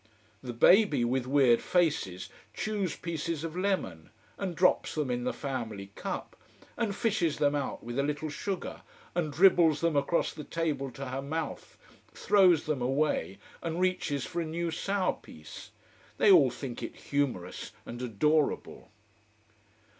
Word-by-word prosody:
The 125 - -5
baby, 145 - +5
with 125 +1 -1
weird 130 -4 +4
faces, 145 - 0 0.3
chews 205 -6 -2
pieces 165 -1 -4
of 165 0 -5
lemon: 180 - -2 0.3
and 185 -4 -4
drops 180 +1 +2
them 150 -5 -1
in 120 0 -2
the - - +1
family 110 -8 -5
cup: - - -5 0.4
and 220 -4 -1
fishes 195 -10 0
them 145 -1 +2
out 145 -2 -3
with 120 +3 -4
a - - +4
little 150 +2 -2
sugar, 190 +4 -4 0.3
and 170 -4 -1
dribbles 165 -2 +5
them 170 -2 +1
across 145 +4 +1
the 150 - -8
table 150 -5 -2
to 130 +1 -7
her 130 +1 -3
mouth, 155 +3 -5 0.4
throws 185 -6 +4
them 150 -4 -1
away 135 -6 0 0.2
and 165 0 -3
reaches 180 -7 0
for 170 - -3
a - - -1
new 165 +1 -2
sour 195 +3 0
piece. 75 -1 -12 0.5
They 205 - +5
all 155 -8 +7
think 125 0 -7
it - - -6
humorous 130 -11 -3
and 120 +1 -7
adorable. 150 +6 0
150 Hz, 150 wpm, -29 LUFS, 130-170 Hz, 0.5 s, all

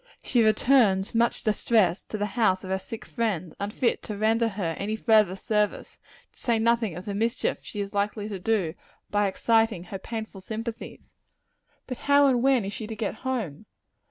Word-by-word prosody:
She 240 -3 +2
returns, 215 -3 +3
much 235 +1 +1
distressed, 210 -4 +1
to 215 - -3
the 205 - -1
house 190 -5 +2
of 190 - -6
her 190 - 0
sick 225 +4 -8
friend, 195 -9 -2
unfit 210 +4 0
to 210 - -6
render 225 +2 +2
her 195 -6 -3
any 210 +2 -2
further 215 -4 +3
service 210 +1 -1 0.3
to - - -16
say 235 -2 +1
nothing 225 -4 +1
of 180 - -8
the 205 - -3
mischief 225 +3 0
she 210 - -8
is 200 0 -5
likely 205 +1 -1
to 200 -3 -5
do 190 -5 0 0.4
by 205 0 +2
exciting 225 -1 +2
her 190 +1 -7
painful 220 -2 -6
sympathies. 225 +4 -7 0.7
But 255 -2 -6
how 285 0 +7
and 255 -3 +3
when 260 -5 +3
is 200 - -4
she 220 - -5
to 220 - -6
get 215 0 -3
home? 220 - -3
215 Hz, 185 wpm, -26 LUFS, 195-230 Hz, 0.7 s, how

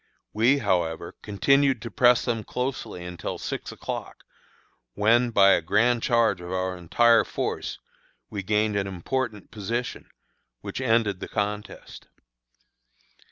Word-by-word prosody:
We, 120 +6 +4
however, 90 - -1
continued 135 +5 +2
to 115 - -6
press 125 -1 +4
them 115 -3 -1
closely 125 -9 -4
until 90 -1 -5
six - - -5
o'clock, - - -7 0.7
when, 115 +4 +3
by 100 -3 +5
a - - +4
grand 115 +8 +2
charge 115 -6 +2
of 90 +1 -7
our 95 0 -1
entire 115 +7 +4
force, - - -4 0.5
we 100 - -5
gained 105 +1 +1
an 100 -1 0
important 105 +4 -4
position, 115 +4 -4 0.5
which - - -5
ended 110 -4 +1
the - - -6
contest. 105 0 -5
105 Hz, 125 wpm, -25 LUFS, 95-120 Hz, 0.7 s, by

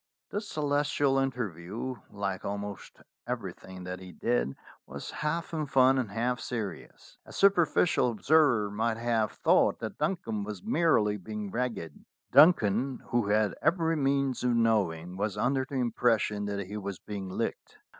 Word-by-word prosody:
The 205 - -2
Celestial's 145 -6 +1
interview, 115 -1 -4
like 100 -2 -3
almost 100 -1 -6 0.3
everything 95 -1 -6
that 90 0 -5
he 95 -1 -10
did, - - -1 0.3
was 70 +1 -7
half 160 +3 -3
in 155 -2 -2
fun 130 0 +4
and 120 -5 -2
half 120 +4 -1
serious. 110 -5 -6
A - - -14
super 195 -4 +4
ficial 150 -4 +2
observer 120 -3 +3
might 110 +2 0
have 115 -2 0
thought - - +3
that - - -6
Duncan 150 - -1
was 100 -3 -7
merely 110 -11 +2
being 105 +1 -6
ragged. 115 -11 -4 0.3
Duncan, 130 - +4
who 120 -3 +1
had 105 0 +2
every 165 0 +2
means 140 -3 0
of 125 -1 +2
knowing, 95 -7 +1
was 105 0 -2
under 130 +4 +1
the 140 - -5
impression 115 -4 +1
that 100 -1 -3
he 105 +3 -6
was 100 -2 -5
being 100 -2 -6
licked. - - -4
115 Hz, 150 wpm, -29 LUFS, 100-135 Hz, 0.3 s, fun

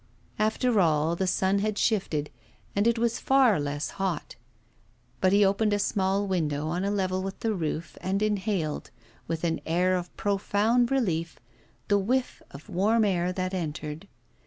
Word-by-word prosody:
After 220 +1 +2
all, 160 -1 +2
the 190 +2 -1
sun 190 +2 +2
had 210 0 -1
shifted, 165 -11 0 0.4
and 205 +3 +2
it 235 0 +3
was 235 0 0
far 265 - +4
less 145 0 -3
hot. 185 -5 -2 0.8
But 185 - +3
he 200 +1 +5
opened 205 +2 +2
a - - +2
small 200 -1 0
window 155 -5 -1
on 175 +3 -1
a 200 - 0
level 185 -2 0
with 195 0 -6
the 225 -1 0
roof, 165 -2 -4
and 195 +2 0
inhaled, 200 -7 -1 0.4
with 165 0 -3
an 165 -1 0
air 180 +3 +2
of 175 -1 -5
profound 205 +4 +1
relief, 170 - -1 0.5
the 205 -1 +3
whiff 250 +6 -1
of 140 +2 -12
warm 215 +5 +2
air 180 -2 +1
that 185 0 -3
entered. 155 0 -4
190 Hz, 160 wpm, -27 LUFS, 170-210 Hz, 0.8 s, he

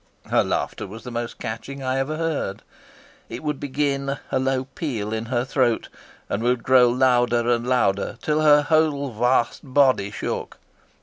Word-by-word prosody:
Her - - +4
laughter - - -2
was 110 +4 -10
the 125 - -7
most 120 0 -4
catching 125 +4 -6
I 130 +1 0
ever 150 +4 -2
heard; 155 -12 -2 0.7
it 115 +5 -7
would 150 -2 -2
begin, 140 -1 -1
a 130 - +1
low 130 0 0
peal 125 -7 -4
in 110 0 -3
her 120 +1 -1
throat, 125 -3 0 0.4
and 100 - -2
would 120 0 +1
grow 125 -1 +5
louder 120 -1 +2
and 120 0 0
louder 100 -6 +1
till 155 0 +1
her 150 -1 +6
whole 150 -3 +1
vast 120 +2 +1
body 130 -7 +3
shook. 105 - -5
130 Hz, 165 wpm, -23 LUFS, 120-140 Hz, 0.7 s, her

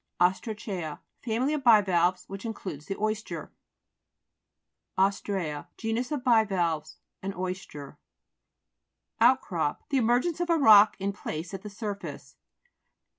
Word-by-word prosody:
OSTRA'CEA 185 -3 -1 0.3
Family 250 +5 0
of 295 -3 -2
bivalves 185 -6 +4
which 195 0 -8
includes 190 -10 -6
the 195 - -3
oyster. 215 +1 -3 1.5
OS'TREA 190 -6 -1
Genus 230 +3 -2
of 290 -4 -2
bivalves; 195 - +1 0.2
an 195 +1 -4
oyster. 180 -6 -6 1.2
OUTCROP 175 - +2
The 275 - +1
emergence 250 +8 +2
of 350 0 -1
a 335 - +4
rock, 215 -7 +7
in 200 +1 -2
place, 165 -3 -6
at 195 - -5
the 210 - -8
surface. 205 0 -7
200 Hz, 115 wpm, -28 LUFS, 180-230 Hz, 1.5 s, rock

